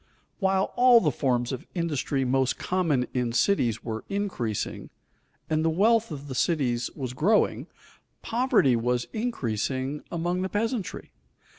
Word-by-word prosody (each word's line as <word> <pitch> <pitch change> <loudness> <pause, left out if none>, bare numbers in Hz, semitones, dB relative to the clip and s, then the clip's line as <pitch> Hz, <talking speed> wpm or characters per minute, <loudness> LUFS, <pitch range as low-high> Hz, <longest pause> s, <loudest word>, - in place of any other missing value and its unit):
While 190 -1 +1
all 245 -1 +7
the 155 -8 +1
forms 125 -2 0
of 130 - -6
industry 150 -5 -1
most 130 0 +1
common 165 -9 0
in 125 -2 -1
cities 120 - +1
were 110 -1 -4
increasing, 190 - -3 0.6
and 155 0 0
the 165 - +3
wealth 220 +7 +3
of 145 -3 -7
the 135 - -5
cities 125 -5 0
was 130 -4 -4
growing, 200 - +2 0.6
poverty 230 - +3
was 120 +1 0
increasing 135 - -2
among 175 +2 -1
the 190 - -2
peasantry. 220 -1 -3
150 Hz, 135 wpm, -26 LUFS, 125-195 Hz, 0.6 s, all